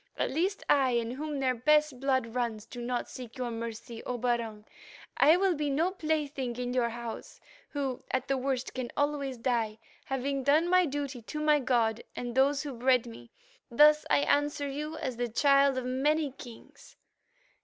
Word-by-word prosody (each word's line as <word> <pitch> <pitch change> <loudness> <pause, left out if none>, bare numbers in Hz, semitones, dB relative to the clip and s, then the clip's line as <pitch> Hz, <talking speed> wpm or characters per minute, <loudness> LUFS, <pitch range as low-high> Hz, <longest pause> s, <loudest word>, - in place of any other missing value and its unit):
At - - 0
least 365 +8 -1
I, 265 -3 +3
in 235 -1 0
whom 295 +3 -4
their 260 -1 +2
best 300 +2 +2
blood 260 -4 0
runs, 230 -4 -2
do 240 +1 -9
not 245 0 -2
seek 250 0 -9
your 250 -2 -3
mercy, 230 0 -6
O 250 - -2
Barung. 230 -3 -2 0.5
I'll 360 +5 +5
be 300 -2 -2
no 320 +6 +1
plaything 295 -8 -2
in 245 0 -3
your 245 -2 +1
house, 235 -1 -7 0.3
who, 275 -3 -3
at 260 0 -1
the 275 - +1
worst, 265 -1 -2
can 255 -2 -4
always 285 -3 -1
die, 230 -3 -1 0.3
having 270 +1 -2
done 300 +5 +3
my 365 -1 +4
duty 280 -3 -4
to 300 +7 -6
my 300 -1 +4
God 235 -3 +1
and 245 -1 -4
those 275 +3 +3
who 285 -2 -5
bred 250 0 +2
me. 115 +1 -11 0.4
Thus 300 +5 +6
I - - +4
answer 290 0 +1
you 300 +3 -5
as 255 -3 -4
the 245 0 -1
Child 275 +2 +4
of 255 - -2
many 285 +3 +1
Kings. 240 -3 -13
260 Hz, 175 wpm, -29 LUFS, 240-290 Hz, 0.5 s, Thus